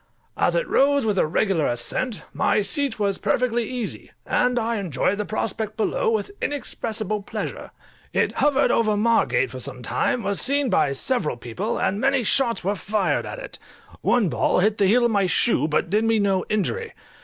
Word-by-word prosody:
As - - +1
it - - 0
rose 280 -2 +3
with 205 -3 +1
a - - +2
regular 170 -1 +1
ascent, 215 - -3
my 210 - +1
seat 280 +2 0
was 200 -2 0
perfectly 235 +2 0
easy, 210 - -5 0.2
and 250 0 +1
I 230 0 0
enjoyed 190 +1 -1
the 210 - -1
prospect 215 0 -3
below - - 0
with 445 -2 -1
inexpressible 220 -7 -3
pleasure. - - -6 0.4
It - - +1
hovered 285 -1 +3
over 215 -2 +2
Margate 230 +2 +2
for - - -7
some - - -6
time, 240 - 0
was 200 0 0
seen 280 0 +2
by 140 - +2
several 150 - -1
people, 125 - -4
and 200 +3 -1
many 270 -1 +2
shots 235 -2 +2
were 195 +3 +1
fired 205 0 -1
at - - -6
it; - - -9 0.4
one 235 -5 +2
ball - - +1
hit 210 +3 +2
the 200 - +4
heel 240 +5 +4
of 235 - +2
my 200 -3 +2
shoe, 180 0 +2
but 160 +2 -1
did 210 +2 +2
me 225 0 +2
no 195 -3 +1
injury. 455 - -2
215 Hz, 185 wpm, -23 LUFS, 195-250 Hz, 0.4 s, the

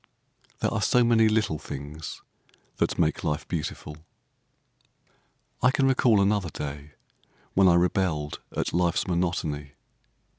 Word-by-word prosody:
There - - 0
are - - -1
so 125 - +4
many 115 -2 +4
little 110 -8 0
things 75 +3 -8 0.5
that - - 0
make 80 -2 +1
life 75 -2 -2
beautiful. 75 -2 -5 1.6
I 125 - +5
can 135 0 +2
recall 125 -5 +4
another 100 -3 +1
day 75 0 -7 0.6
when 95 0 +5
I 85 - +6
rebelled 85 -4 0 0.2
at - - -1
life's 85 0 +1
monotony. 85 -5 -2
85 Hz, 120 wpm, -26 LUFS, 75-105 Hz, 1.6 s, I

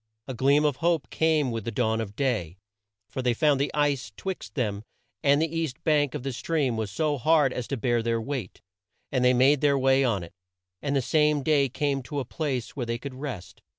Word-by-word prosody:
A 130 - -4
gleam 140 +5 +3
of 145 -4 +1
hope 170 -3 0
came 155 -5 +2
with 115 -2 -3
the - - -3
dawn 110 0 0
of 105 -2 -6
day, 105 - -1 0.5
for 130 - -4
they 125 -2 +1
found 145 0 +3
the 140 - 0
ice 145 -7 0
'twixt 175 - -6
them 105 -4 -2 0.4
and 140 0 +4
the 160 +1 -1
east 160 -6 -3
bank 150 -3 +2
of 140 - -4
the 135 -1 -3
stream 135 0 -1
was 110 -2 -2
so 145 +7 -1
hard 150 -1 +3
as 125 - -4
to 140 - -3
bear 120 0 +1
their 115 0 0
weight, 120 -4 -5 0.5
and 130 -2 +1
they 125 0 +5
made 135 +3 +4
their 145 -2 +3
way 135 0 +3
on 110 -8 0
it, 85 - -11 0.5
and 140 -1 -1
the 135 - +1
same 150 0 +2
day 140 -2 +3
came 140 +1 -1
to 145 +3 -5
a 135 - -3
place 130 -3 -3
where 125 -4 -3
they 115 0 -1
could 135 +2 -7
rest. 130 -9 -7
135 Hz, 220 wpm, -26 LUFS, 120-145 Hz, 0.5 s, they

